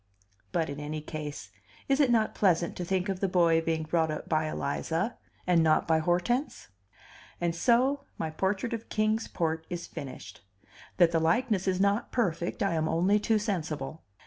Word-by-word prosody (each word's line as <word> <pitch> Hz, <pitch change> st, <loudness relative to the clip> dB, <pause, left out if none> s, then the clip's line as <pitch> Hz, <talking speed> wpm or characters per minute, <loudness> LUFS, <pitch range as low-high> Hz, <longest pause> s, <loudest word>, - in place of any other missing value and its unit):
But, 165 Hz, -2 st, 0 dB
in 140 Hz, 0 st, -6 dB
any 150 Hz, +1 st, -4 dB
case, 150 Hz, -, -7 dB, 0.4 s
is 275 Hz, +1 st, +2 dB
it 280 Hz, -4 st, +4 dB
not 225 Hz, -2 st, +2 dB
pleasant 175 Hz, -4 st, +2 dB
to 180 Hz, -, -4 dB
think 185 Hz, +2 st, -1 dB
of 190 Hz, -2 st, -2 dB
the 195 Hz, -, +1 dB
boy 170 Hz, -3 st, +3 dB
being 160 Hz, -1 st, -1 dB
brought 160 Hz, 0 st, +1 dB
up 155 Hz, -, -4 dB
by 155 Hz, -1 st, +1 dB
Eliza, 165 Hz, +8 st, -2 dB, 0.3 s
and 175 Hz, -2 st, +4 dB
not 155 Hz, -1 st, +3 dB
by 160 Hz, -1 st, +3 dB
Hortense? 180 Hz, -, -1 dB, 0.7 s
And 170 Hz, -1 st, 0 dB
so 260 Hz, +9 st, +2 dB
my 160 Hz, -, -3 dB
portrait 195 Hz, +8 st, -1 dB
of 230 Hz, 0 st, -5 dB
Kings 215 Hz, +1 st, 0 dB
Port 160 Hz, -1 st, -2 dB
is 175 Hz, -1 st, -4 dB
finished. 130 Hz, -6 st, -9 dB, 0.6 s
That 175 Hz, -2 st, +5 dB
the 165 Hz, -, +2 dB
likeness 190 Hz, +4 st, +1 dB
is 185 Hz, -1 st, +1 dB
not 200 Hz, +3 st, +1 dB
perfect, 175 Hz, -8 st, -1 dB
I 195 Hz, -3 st, +1 dB
am 160 Hz, -1 st, 0 dB
only 190 Hz, +5 st, +3 dB
too 220 Hz, +1 st, +2 dB
sensible. 160 Hz, -, -3 dB
175 Hz, 175 wpm, -29 LUFS, 160-210 Hz, 0.7 s, That